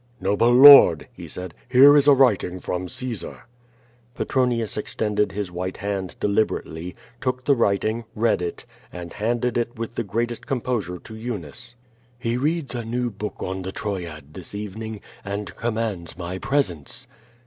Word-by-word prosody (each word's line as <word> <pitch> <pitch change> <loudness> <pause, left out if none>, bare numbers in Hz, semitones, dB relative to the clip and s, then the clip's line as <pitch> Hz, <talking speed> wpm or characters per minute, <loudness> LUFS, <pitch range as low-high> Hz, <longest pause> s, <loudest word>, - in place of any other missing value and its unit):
"Noble 105 +5 +2
Lord," 130 - +9
he - - -10
said, 90 -2 -7 0.2
"here 135 +3 +8
is 145 -1 +4
a 145 - +9
writing 105 -9 +2
from 90 0 -3
Caesar." 120 +2 -6 0.7
Petronius 120 -5 0
extended 105 0 -1
his 100 -2 -4
white 90 +1 -4
hand 100 -2 -4
deliberately, 90 -5 -1 0.3
took 130 -1 -2
the 140 - +5
writing, 110 0 0
read 110 -3 +2
it, 85 -1 -5 0.3
and 85 -1 -8
handed 120 +2 0
it 120 0 -3
with 115 0 -5
the 115 - -2
greatest 115 +3 -3
composure 120 -8 -2
to 110 - -11
Eunice. 110 - -7 0.4
"He 120 -1 -2
reads 145 +1 -1
a 120 -1 -3
new 120 +2 -2
book 105 +1 -6
on 95 +1 -3
the 95 +1 -5
Troyad 85 -9 -5
this 95 +2 -8
evening, 105 +1 -6 0.2
and 100 -2 -5
commands 110 -8 -3
my 90 +1 -5
presence." 135 - -2
110 Hz, 150 wpm, -23 LUFS, 95-120 Hz, 0.7 s, Lord